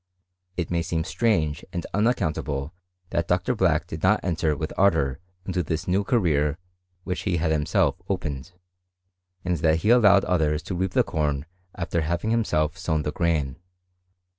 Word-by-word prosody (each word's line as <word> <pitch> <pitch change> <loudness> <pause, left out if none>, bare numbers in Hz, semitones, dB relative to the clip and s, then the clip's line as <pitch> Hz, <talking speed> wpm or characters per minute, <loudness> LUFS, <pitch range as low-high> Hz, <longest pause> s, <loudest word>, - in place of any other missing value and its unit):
It 90 -1 -2
may 85 -1 +1
seem 80 -1 -1
strange 90 -5 0
and 85 - -4
unaccountable 80 - 0 0.4
that 85 0 0
Dr. 90 +7 +1
Black 90 -8 +2
did 80 - -7
not 95 +5 +4
enter 80 -4 0
with 80 +1 -4
ardour 80 -9 +2 0.3
into 95 -1 -1
this 80 0 -3
new 95 +3 +2
career 80 - +1 0.5
which 90 -1 -3
he 90 -4 0
had 80 -1 0
himself 80 +3 +1
opened, 80 -6 -3 0.9
and 90 -1 +1
that 80 0 +3
he 105 - +3
allowed 105 -5 +6
others 80 -3 +1
to - - -5
reap 95 0 -1
the - - +4
corn 75 -2 -1 0.3
after 85 -1 -1
having 85 +7 -1
himself 95 -7 0
sown 80 -4 0
the 75 - -2
grain. 80 -6 0
85 Hz, 160 wpm, -25 LUFS, 75-95 Hz, 0.9 s, allowed